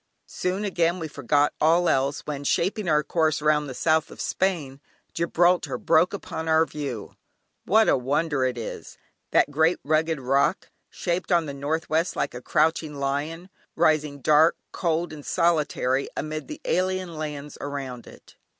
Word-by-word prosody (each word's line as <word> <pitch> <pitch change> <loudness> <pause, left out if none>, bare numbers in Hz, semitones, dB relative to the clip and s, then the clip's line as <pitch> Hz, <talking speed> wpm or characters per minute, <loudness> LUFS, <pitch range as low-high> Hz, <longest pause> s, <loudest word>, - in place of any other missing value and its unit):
Soon 185 +3 -3
again 175 -3 +1
we 165 -3 -4
forgot 145 0 +1
all 170 +3 +4
else, 135 0 +1
when, 145 -2 -5
shaping 185 +6 0
our 150 -1 +3
course 160 -2 +1
round 150 -1 +1
the 130 - -7
south 160 +1 +1
of - - -13
Spain, 155 -8 -1 0.3
Gibraltar 175 +1 +2
broke 180 - +3
upon 165 -5 -5
our 160 0 +4
view. 140 -9 -6 0.5
What 220 +3 +4
a - - +5
wonder 145 +2 0
it 125 -1 -1
is! 115 - -7 0.3
that - - +3
great 160 +4 +3
rugged 155 +1 +1
rock, 135 +2 +1 0.2
shaped 175 +2 -3
on 170 -2 +3
the 140 - -5
northwest 160 +4 -1
like - - -2
a 125 - -7
crouching 155 +1 +1
lion, 145 +6 -3 0.2
rising 155 -3 +1
dark, 155 +4 +4
cold 170 -1 -1
and 150 -2 -9
solitary, 150 -6 +1
amid 155 +1 -4
the 305 - -8
alien 185 -1 0
lands 150 -2 -6
around 135 -4 -6
it. - - -16
155 Hz, 155 wpm, -25 LUFS, 140-170 Hz, 0.5 s, a